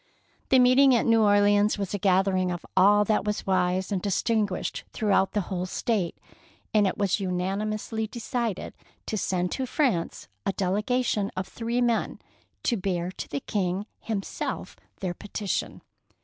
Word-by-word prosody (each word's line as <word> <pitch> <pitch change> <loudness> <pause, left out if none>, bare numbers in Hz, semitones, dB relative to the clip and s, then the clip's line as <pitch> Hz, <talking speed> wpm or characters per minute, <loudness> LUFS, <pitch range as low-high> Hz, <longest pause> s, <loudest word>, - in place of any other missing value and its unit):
The 265 - +6
meet 255 +1 +5
ing 275 -2 +7
at 235 - +2
New 230 -1 +4
Orleans 205 0 +4
was 200 -1 -3
a 205 - -1
gathering 185 -1 +2
of 175 -1 -4
all 205 +2 +5
that 215 +1 +1
was 210 0 -2
wise 185 0 +1
and 190 -3 0
distinguished 205 0 -1
throughout 195 -3 +2
the 210 - +1
whole 185 0 -3
State, 200 -4 -1 0.6
and 210 -2 +4
it 185 - -2
was 200 0 +1
unanimously 205 +4 -2
decided 230 -2 -3 0.3
to - - -3
send 180 -3 -1
to 260 -1 -2
France 235 - 0 0.2
a 195 - -1
delegation 210 +2 0
of 185 - -2
three 235 +1 -2
men, 235 -2 +1 0.5
to 235 - +1
bear 180 -2 -2
to - - -7
the 140 - -3
King 190 -1 -1
himself 210 -4 -4 0.3
their 185 -2 -2
petition. 205 +1 -4
205 Hz, 155 wpm, -26 LUFS, 185-220 Hz, 0.6 s, ing